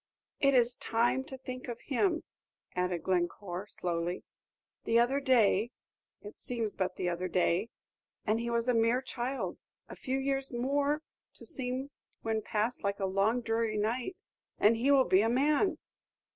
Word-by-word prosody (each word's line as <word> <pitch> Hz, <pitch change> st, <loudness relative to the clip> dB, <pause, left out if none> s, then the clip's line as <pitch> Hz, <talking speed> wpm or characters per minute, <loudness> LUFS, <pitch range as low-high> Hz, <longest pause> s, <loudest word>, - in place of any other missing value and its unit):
"It 275 Hz, -1 st, +4 dB
is 245 Hz, 0 st, +4 dB
time 240 Hz, +3 st, +1 dB
to 265 Hz, -, -8 dB
think 255 Hz, -1 st, -7 dB
of 235 Hz, -1 st, -5 dB
him," 330 Hz, +4 st, +1 dB, 0.5 s
added 180 Hz, -2 st, -1 dB
Glencore, 180 Hz, +1 st, -1 dB
slowly. 175 Hz, -2 st, -2 dB, 0.6 s
"The 230 Hz, -, +2 dB
other 245 Hz, +4 st, +3 dB
day, 235 Hz, -5 st, +3 dB, 0.5 s
it 205 Hz, -, -9 dB
seems 230 Hz, -4 st, -3 dB
but 185 Hz, -1 st, -2 dB
the 180 Hz, -, -2 dB
other 175 Hz, +1 st, -1 dB
day, 185 Hz, +3 st, +1 dB, 0.6 s
and 220 Hz, +1 st, +2 dB
he 235 Hz, 0 st, -2 dB
was 235 Hz, 0 st, 0 dB
a 250 Hz, -, +4 dB
mere 230 Hz, +3 st, +3 dB
child; 260 Hz, +1 st, -3 dB, 0.3 s
a -, -, -9 dB
few 265 Hz, +1 st, -2 dB
years 270 Hz, 0 st, -1 dB
more, 280 Hz, +5 st, 0 dB, 0.3 s
to -, -, -10 dB
seem 265 Hz, -2 st, -3 dB, 0.3 s
when 220 Hz, -1 st, 0 dB
past 215 Hz, +4 st, -1 dB
like 200 Hz, 0 st, -1 dB
a 195 Hz, -, 0 dB
long 195 Hz, +6 st, +2 dB
dreary 225 Hz, -1 st, 0 dB
night, 240 Hz, -, -1 dB, 0.4 s
and 215 Hz, +2 st, +5 dB
he 240 Hz, +5 st, +1 dB
will 275 Hz, -2 st, +6 dB
be 185 Hz, -, +5 dB
a 225 Hz, -, +2 dB
man." 300 Hz, -, +2 dB
235 Hz, 160 wpm, -31 LUFS, 205-265 Hz, 0.6 s, will